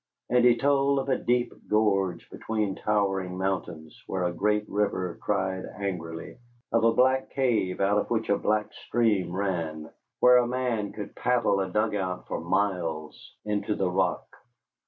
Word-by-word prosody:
And 125 -1 +4
he 120 -1 +6
told 140 +2 +2
of 135 0 -2
a 130 - +3
deep 120 0 +1 0.2
gorge 100 -5 +1
between 110 -3 -2
towering 95 -3 -1
mountains 95 -5 -3
where 95 -1 -2
a 90 0 0
great 105 +3 0
river 95 -3 -1
cried 95 -2 -1
angrily, 85 -4 -5 0.3
of 115 0 +2
a 115 - +5
black 130 +2 +2
cave 115 -9 0
out 100 +1 +3
of - - -3
which 115 -1 0
a 100 - +3
black 105 0 0
stream 105 -7 0
ran, 85 -5 -3 0.3
where 125 0 +7
a 120 -1 +3
man 120 -4 -1
could 105 - -8
paddle 120 -5 +1
a 95 -1 -1
dugout 100 -2 -1
for - - -3
miles 85 -6 -2
into 105 0 -1
the 95 -2 0
rock. 90 -1 0
105 Hz, 155 wpm, -27 LUFS, 95-115 Hz, 0.3 s, where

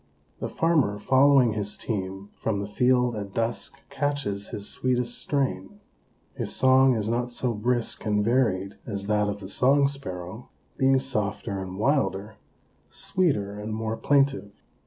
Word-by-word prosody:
The 115 - -3
farmer 150 -9 +2
following 130 +1 +4
his 105 -1 -3
team 95 -2 -4
from 110 -3 -2
the 100 - -3
field 125 +2 +2
at 100 -2 -6
dusk 115 +4 -3
catches 140 -9 -2
his 100 -1 -6
sweetest 125 -1 -1
strain. 105 -9 -2 0.5
His - - -4
song 130 0 +5
is 110 -2 -2
not 120 +2 0
so 120 0 -2
brisk 120 +2 -1
and 105 -1 +1
varied 110 -6 +1
as 100 -3 -4
that 105 0 +1
of 100 0 -4
the 95 - -8
Song 140 +7 +3
Sparrow, 110 -7 -7 0.3
being 135 0 +3
softer 105 -5 -3
and 95 0 -6
wilder, 105 -5 0 0.6
sweeter 105 - -1
and 110 +1 -4
more 110 0 -2
plaintive. 135 -8 +1
110 Hz, 145 wpm, -26 LUFS, 100-130 Hz, 0.6 s, song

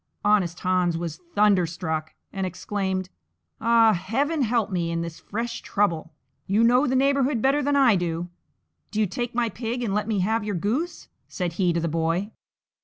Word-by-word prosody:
Honest 190 -5 +2
Hans 180 -2 +1
was 165 -1 -5 0.2
thunderstruck, 175 -6 +1 0.2
and 195 - -3
exclaimed, 190 0 -2 0.5
"Ah, 230 -1 +5
Heaven 270 - -1
help 230 -3 +1
me 170 -2 -1
in 170 0 -1
this 170 -1 -7
fresh 230 +3 -4
trouble! 170 -6 0 0.4
you 205 +4 +3
know 250 +4 +4
the 260 - +1
neighbourhood 275 -1 +2
better 275 +5 +2
than 285 +1 +1
I 265 -6 +5
do; 170 0 -2 0.6
do 215 - -3
you 215 - +4
take 235 +5 -4
my 240 -1 +2
pig 235 +3 -4
and 210 -4 -1
let 210 +1 0
me 210 -4 0
have 220 +4 +1
your 205 -2 -2
goose," 245 - -2 0.2
said 180 -3 -3
he 180 0 +1
to 170 - 0
the 170 - -1
boy. 165 +5 -1
205 Hz, 180 wpm, -25 LUFS, 175-235 Hz, 0.6 s, Ah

